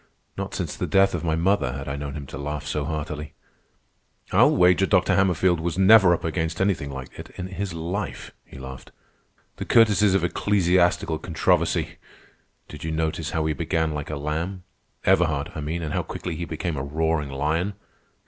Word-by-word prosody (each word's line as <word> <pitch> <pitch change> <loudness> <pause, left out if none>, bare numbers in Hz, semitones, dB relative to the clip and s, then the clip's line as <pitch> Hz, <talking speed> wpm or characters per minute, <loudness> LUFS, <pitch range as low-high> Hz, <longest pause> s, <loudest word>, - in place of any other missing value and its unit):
Not - - -5
since - - -3
the - - -3
death 95 0 +4
of 85 -2 -3
my 80 -2 +1
mother 85 -6 +1
had 70 +1 -6
I 70 - -3
known 70 -1 -5
him 75 -2 -6
to 65 - -8
laugh 75 +1 -4
so 75 -1 -2
heartily. 75 0 -5 1.0
"I'll - - +5
wager 90 +2 +4
Dr. 90 -1 +3
Hammerfield 90 -2 +2
was 85 +1 -3
never 95 -1 +7
up - - -8
against 80 +1 -2
anything 95 -7 0
like 65 -2 -7
it - - -8
in 90 - -5
his 95 -2 -4
life," 90 +6 -4
he - - -14
laughed. 65 0 -9 0.7
"'The - - -5
courtesies 105 -3 +4
of 95 - +1
ecclesiastical 90 -2 +2
controversy!' - - 0 0.7
Did 75 - -10
you 80 - -3
notice 80 0 -2
how 80 -1 -1
he 80 - +1
began 80 -1 -1
like 75 -1 -5
a 75 - -3
lamb—Everhard, 85 0 -1
I 80 - -5
mean, 80 +3 -3
and 75 -1 -3
how - - +1
quickly 90 -3 -5
he 85 - -4
became 80 -1 -4
a 65 - -3
roaring 80 0 -1
lion? 80 +8 -1
80 Hz, 180 wpm, -24 LUFS, 75-90 Hz, 1.0 s, never